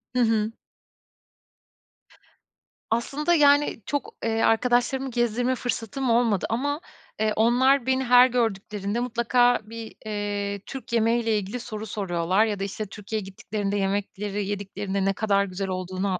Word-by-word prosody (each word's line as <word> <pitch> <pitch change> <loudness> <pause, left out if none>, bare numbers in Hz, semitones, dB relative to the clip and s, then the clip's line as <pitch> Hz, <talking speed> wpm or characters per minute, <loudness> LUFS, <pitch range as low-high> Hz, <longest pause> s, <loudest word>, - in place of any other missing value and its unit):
Hı 250 - +2
hı. 220 -1 +2 2.4
Aslında, 280 +9 0
yani, 290 -4 +4
çok, 285 -1 -3
eee, 225 0 0
arkadaşlarımı 245 +3 +2
gezdirme 240 +2 +1
fırsatım 245 +1 -3
olmadı 230 -4 +2
ama, 285 +7 -1 0.4
eee, 215 -1 +1
onlar 245 +4 +4
beni 260 0 +1
her 250 0 +7
gördüklerinde 210 -3 -1
mutlaka 245 0 +2
bir, 225 +1 -9
eee, 205 -1 -3
Türk 260 -4 -8
yemeği 230 +1 +2
ile 220 -1 +2
ilgili 205 +5 -4
soru 220 -2 -6
soruyorlar. 190 0 +1
Ya 205 -3 -2
da, - - -2
işte, 205 +2 -4
Türkiye'ye 210 +1 -5
gittiklerinde 200 +1 -3
yemekleri 200 +1 -2
yediklerinde 200 -1 -3
ne 195 - +2
kadar 200 -1 +1
güzel 190 +1 -4
olduğunu 185 0 -2
220 Hz, 135 wpm, -25 LUFS, 200-245 Hz, 2.4 s, her